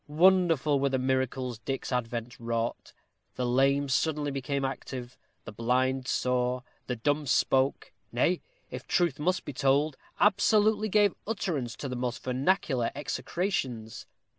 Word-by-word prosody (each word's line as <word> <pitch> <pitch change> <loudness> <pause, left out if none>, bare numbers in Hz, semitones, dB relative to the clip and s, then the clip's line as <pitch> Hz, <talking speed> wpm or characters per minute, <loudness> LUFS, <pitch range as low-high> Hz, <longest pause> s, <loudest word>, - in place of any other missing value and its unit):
Wonderful 165 -3 +4
were 140 0 +2
the 130 - +1
miracles 130 -2 -1
Dick's 135 +2 -4
advent 120 -1 -3
wrought. 115 0 -3 0.4
The 125 - -1
lame 135 +3 +3
became 140 - -6
suddenly 145 0 0 0.2
active, 130 -2 -5 0.3
the - - -7
blind 130 +4 0
saw, 125 0 0 0.3
the 125 - -1
dumb 145 +5 0
spoke; 130 +1 +1 0.2
nay, 150 +9 +1 0.3
if - - -7
truth 170 -6 +1
must 180 +5 0
be 145 - -5
told, 140 +2 +2 0.2
absolutely 210 +1 +3
gave 205 -1 +4
utterance 155 - -2
to 130 -3 -5
"most 125 0 -3
vernacular 130 -1 +1
execrations." 135 - -3
135 Hz, 130 wpm, -29 LUFS, 125-155 Hz, 0.4 s, Wonderful